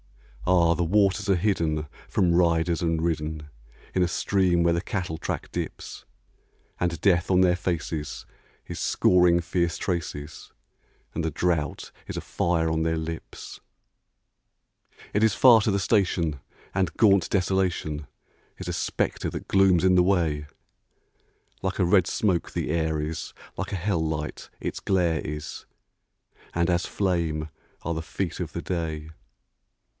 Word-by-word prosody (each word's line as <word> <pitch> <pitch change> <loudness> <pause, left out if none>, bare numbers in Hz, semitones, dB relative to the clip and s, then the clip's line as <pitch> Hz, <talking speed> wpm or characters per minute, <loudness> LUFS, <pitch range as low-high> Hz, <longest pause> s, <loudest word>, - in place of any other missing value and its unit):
Ah! 85 -2 +5
the 85 +1 0
waters 100 +3 +2
are 95 - +5
hidden 85 -5 0 0.2
from 90 -2 +2
riders 85 0 +2
and 80 -2 0
ridden 75 -2 -2 0.4
In 95 - +1
a 90 - +3
stream 90 -1 +2
where 85 0 +3
the 85 - 0
cattle 90 -5 -3
track - - -4
dips; - - -6 0.7
And 85 -2 -1
Death 90 -3 +3
on 95 -1 +4
their 90 -1 +4
faces 85 -4 -3 0.4
is - - -6
scoring 90 -1 +4
fierce 85 0 0
traces, 80 -4 -4 0.6
And - - -2
the 80 - 0
drouth 80 -2 -1 0.2
is - - -5
a - - -2
fire 85 -2 0
on 80 0 0
their 80 0 +1
lips. 80 0 -7 1.5
It 105 - +2
is 110 -4 +4
far 120 -4 +7
to 105 - +1
the 100 - +1
station, 90 -7 +1 0.3
and 95 -1 -1
gaunt 100 -5 +4
Desolation 90 -6 0 0.5
Is - - -7
a - - -2
spectre - - -1
that - - -7
glooms 95 -3 +4
in 95 0 +5
the 90 -1 +5
way; 80 -6 +1 1.1
Like 95 0 -2
a 95 - +3
red 90 0 +4
smoke 95 -4 0
the - - -2
air 80 -1 0
is, 75 +2 -4 0.2
like - - -4
a - - -1
hell 90 -2 0
light 80 -1 -4
its - - -4
glare 85 -5 +1
is, 75 0 -6 0.9
And 85 +1 +2
as 85 0 +1
flame 85 -5 -1 0.3
are 85 - -1
the 80 - -3
feet 85 +1 -4
of 85 -3 -3
the 85 - -4
day. 80 -3 -3
85 Hz, 150 wpm, -26 LUFS, 80-95 Hz, 1.5 s, far